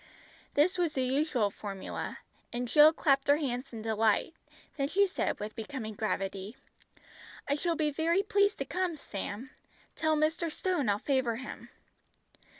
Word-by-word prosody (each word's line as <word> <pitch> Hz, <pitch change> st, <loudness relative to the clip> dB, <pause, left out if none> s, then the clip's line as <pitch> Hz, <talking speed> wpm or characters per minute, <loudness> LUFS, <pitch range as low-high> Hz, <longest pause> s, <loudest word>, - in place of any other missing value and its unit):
This 355 Hz, +6 st, +3 dB
was 335 Hz, -3 st, +1 dB
the 260 Hz, -, 0 dB
usual 255 Hz, -5 st, +1 dB
formula, 195 Hz, -1 st, -5 dB, 0.3 s
and 245 Hz, +1 st, -2 dB
Jill 300 Hz, +5 st, +8 dB
clapped 275 Hz, -4 st, +2 dB
her 285 Hz, +1 st, +6 dB
hands 260 Hz, -3 st, -3 dB
in 225 Hz, -2 st, -7 dB
delight; 220 Hz, +6 st, +2 dB, 0.4 s
then 275 Hz, -2 st, 0 dB
she 400 Hz, +6 st, +4 dB
said 380 Hz, -, -2 dB
with 210 Hz, +1 st, -5 dB
becoming 225 Hz, -2 st, -5 dB
gravity 195 Hz, 0 st, -3 dB, 0.9 s
"I 280 Hz, -, +2 dB
shall 335 Hz, +3 st, 0 dB
be 305 Hz, -2 st, +1 dB
very 335 Hz, +6 st, +2 dB
pleased 405 Hz, -1 st, +2 dB
to -, -, -3 dB
come, 365 Hz, -3 st, -1 dB
Sam. 215 Hz, +1 st, -6 dB, 0.4 s
Tell 315 Hz, -1 st, +2 dB
Mr. 315 Hz, +2 st, +1 dB
Stone 335 Hz, -, 0 dB
I'll 200 Hz, -, +3 dB
favour 260 Hz, -1 st, 0 dB
him." 255 Hz, +3 st, -8 dB
275 Hz, 150 wpm, -31 LUFS, 225-320 Hz, 0.9 s, Jill